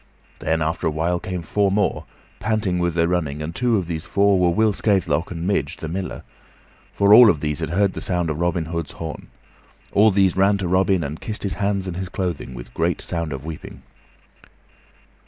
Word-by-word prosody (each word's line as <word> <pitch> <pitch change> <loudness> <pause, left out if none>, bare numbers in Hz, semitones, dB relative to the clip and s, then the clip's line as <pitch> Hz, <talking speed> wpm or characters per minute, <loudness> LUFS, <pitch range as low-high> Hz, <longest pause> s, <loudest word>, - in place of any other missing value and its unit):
Then, 80 0 0
after 80 +1 -1
a - - +3
while, 85 +3 -1
came 90 -2 -5
four 100 +4 +1
more, 100 +1 0 0.3
panting 105 -4 0
with 85 -1 0
their 85 0 +2
running, 80 -5 -1
and 80 +2 -5
two 120 -3 +2
of 95 - -1
these 80 -2 -4
four 100 -1 +2
were 90 -1 +3
Will 110 +5 +2
Scathelock 90 -7 +1
and 85 -1 -5
Midge, 80 -6 -1
the 80 - -6
Miller; 90 +3 -5 0.7
for 100 +1 +4
all 120 0 +10
of 80 - +2
these 75 -1 -2
had - - -3
heard 95 +3 +1
the - - -6
sound 90 -3 0
of 75 - -4
Robin 85 -1 0
Hood's 85 -1 -4
horn. 80 -2 -7 0.6
All 105 +2 +5
these 95 -3 +3
ran 100 +2 +3
to 95 -2 -3
Robin 95 0 +2
and 75 +2 -6
kissed 110 -1 -4
his 100 - -1
hands 100 -1 -1
and 90 -2 -5
his 95 -1 -4
clothing, 90 -9 -4
with - - -10
great - - 0
sound 85 -2 -3
of 70 +1 -6
weeping. 80 -1 -8
90 Hz, 205 wpm, -22 LUFS, 80-100 Hz, 0.7 s, all